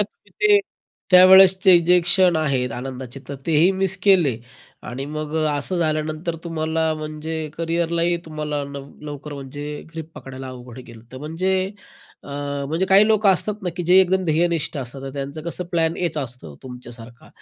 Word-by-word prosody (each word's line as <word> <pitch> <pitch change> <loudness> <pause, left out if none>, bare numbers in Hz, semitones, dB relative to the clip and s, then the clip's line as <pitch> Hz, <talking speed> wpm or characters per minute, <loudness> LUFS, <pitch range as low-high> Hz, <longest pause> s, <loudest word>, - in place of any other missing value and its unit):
ते, - - +5 0.4
ते 420 -1 +6 0.5
त्यावेळेसचे 190 0 +8
जे 180 +2 +4
क्षण 175 0 +3
आहेत 135 -6 0
आनंदाचे 130 +1 -7
तर 140 - -5
तेही 165 +2 +4
मिस 190 0 -1
केले 175 - +4 0.5
आणि 125 +2 -5
मग 155 0 -5
अ, 155 -1 +1
असं 180 +6 -2
झाल्यानंतर 155 +1 -2
तुम्हाला 160 -1 -1
म्हणजे 155 +1 -5
करिअरलाही 170 +1 0
तुम्हाला 150 -2 -4
लव 140 0 -8 0.2
लवकर 145 0 -7
म्हणजे 140 +1 -8 0.3
ग्रिप 160 -1 -7
पकडायला 130 0 -9
अवघड 125 -1 -10
गेलं 120 -3 -12
तर - - -8
म्हणजे 165 +6 -2 0.7
अ, - - -14 0.4
म्हणजे 165 +5 0
काही 195 +2 +6
लोक 215 -1 +2
असतात 200 +2 +1
ना 180 - -2
की 175 - -2
जे 180 +2 +5
एकदम 190 0 +1
ध्येयनिष्ठ 165 0 0
असतात, 135 +1 -6
तर 135 - -6
त्यांचं 140 +2 -6
कसं 170 +2 -4
प्लॅन 165 -1 +1
एच 170 -3 -2
असतं 125 - -7
तुमच्यासारखा. 120 -2 -11
160 Hz, 160 wpm, -22 LUFS, 140-175 Hz, 0.7 s, त्यावेळेसचे